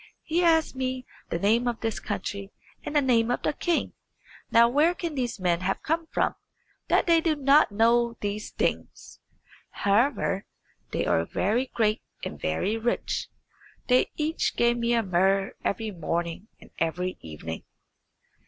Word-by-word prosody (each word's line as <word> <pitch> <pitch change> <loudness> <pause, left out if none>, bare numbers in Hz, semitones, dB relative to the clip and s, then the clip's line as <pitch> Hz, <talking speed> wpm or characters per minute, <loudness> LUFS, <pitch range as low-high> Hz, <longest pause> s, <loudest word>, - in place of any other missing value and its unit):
He 335 +3 0
asked 320 -4 +3
me 255 -1 -3 0.2
the - - -1
name 225 +7 +2
of 235 -1 -2
this 225 -2 -2
country 200 0 -4 0.3
and 300 - -5
the 295 - +4
name 235 -3 +3
of 245 - -1
the - - +1
king. 340 +3 -1 0.6
Now 235 0 +6
where 300 +8 +3
can 340 -3 -4
these 245 -5 -2
men 175 -2 +1
have 190 +1 -2
come 325 +1 -1
from, - - 0 0.5
that - - +3
they 335 -1 +4
do 320 -2 +1
not 285 -1 +4
know 235 +2 +3
these 205 +1 -3
things? - - -3 0.5
However, 205 -1 +1 0.4
they - - -1
are 80 - +2
very 220 - 0
great 215 -3 0 0.2
and - - -7
very 190 - 0
rich. 235 +2 -1 0.6
They 250 0 +4
each 310 +1 0
give 235 0 +3
me 235 0 +1
a 230 - +2
muhr 195 +1 +2
every 220 +1 -1
morning 170 +2 -3
and - - -17
every 180 +3 -1
evening." 80 +1 -7
230 Hz, 155 wpm, -26 LUFS, 195-265 Hz, 0.6 s, Now